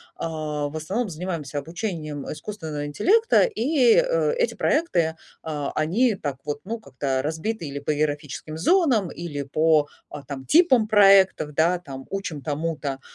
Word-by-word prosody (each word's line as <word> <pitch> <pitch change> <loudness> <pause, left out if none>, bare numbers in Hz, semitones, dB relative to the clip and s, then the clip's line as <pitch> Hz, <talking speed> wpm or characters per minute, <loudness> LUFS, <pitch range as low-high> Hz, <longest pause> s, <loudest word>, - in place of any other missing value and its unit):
а, 155 -2 -3
в 155 - -6
основном 200 +9 -2
занимаемся 160 -4 -5
обучением 155 -2 -4
искусственного 155 -4 -5
интеллекта, 445 - +3
и, 285 - +3
э, - - +2
эти 485 -1 +1
проекты, 170 - +1 0.3
а, 150 -3 -3
они 210 +10 +2
так 145 -7 -4
вот, 145 0 -4
ну, 225 +4 -4
как-то 135 -6 -2
разбиты 160 +5 -3
или 140 0 -5
по 145 +2 -1
географическим 150 +1 -3
зонам, 250 - +3
или 150 -5 -5
по, 155 +1 +2 0.2
а, 145 - -8
там 135 -1 -7
типам 265 - +4
проектов, 195 -7 +5
да, 170 +4 +2
там 135 -6 -9
учим 195 -7 -4
тому-то. 145 -1 -3
160 Hz, 145 wpm, -24 LUFS, 145-215 Hz, 0.3 s, проектов